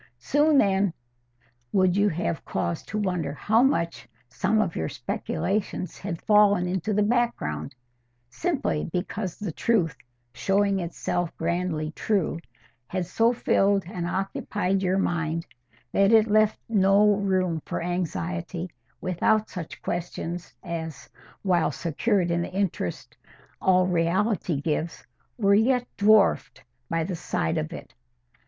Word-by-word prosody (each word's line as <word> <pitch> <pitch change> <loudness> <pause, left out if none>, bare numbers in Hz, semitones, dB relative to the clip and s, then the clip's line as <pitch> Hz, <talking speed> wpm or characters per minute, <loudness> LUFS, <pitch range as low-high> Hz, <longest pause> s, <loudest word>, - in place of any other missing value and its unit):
Soon 290 - +3
then 195 -6 +3 0.8
would 185 -2 +3
you 205 +1 +3
have 165 -1 -2
cause 170 - -2
to 215 - -4
wonder 180 -8 -1
how 220 +9 +3
much 170 - 0 0.2
some 195 - +1
of 190 -6 0
your 80 - -2
speculations 190 - -3
had 175 -4 -5
fallen 210 -3 +5
into 185 +3 -1
the 210 0 +2
background, 205 - -1 0.6
simply 285 - -1
because 185 +1 -3
the 205 -5 -4
truth, 180 -3 +1 0.4
showing 200 +3 +1
itself 175 0 -3
grandly 165 -2 -1
true, 180 -2 -1 0.5
had 185 +1 -2
so 225 +6 +2
filled 200 -4 +2
and 175 -1 -4
occupied 195 +1 -1
your 185 0 +1
mind 165 -3 -1 0.5
that 195 +1 +4
it 220 -1 +6
left 215 0 +3
no 205 -1 +4
room 185 -5 0
for - - -2
anxiety 175 0 -3 0.4
about 215 +4 +1
such 175 -4 -7
questions 175 0 -4
as, 160 -5 -6 0.3
while 180 -4 +2
secured 175 +2 0
in 170 0 +1
the 170 - -4
interest 185 - -3 0.5
all 185 -1 +4
reality 180 -1 +1
gives, 155 +2 -2 0.3
were 200 -4 +3
yet 245 +4 +3
dwarfed 200 - +3 0.3
by 165 -1 0
the 180 +2 -3
side 80 - -1
of 75 - -4
it. - - -9
185 Hz, 130 wpm, -26 LUFS, 170-205 Hz, 0.8 s, it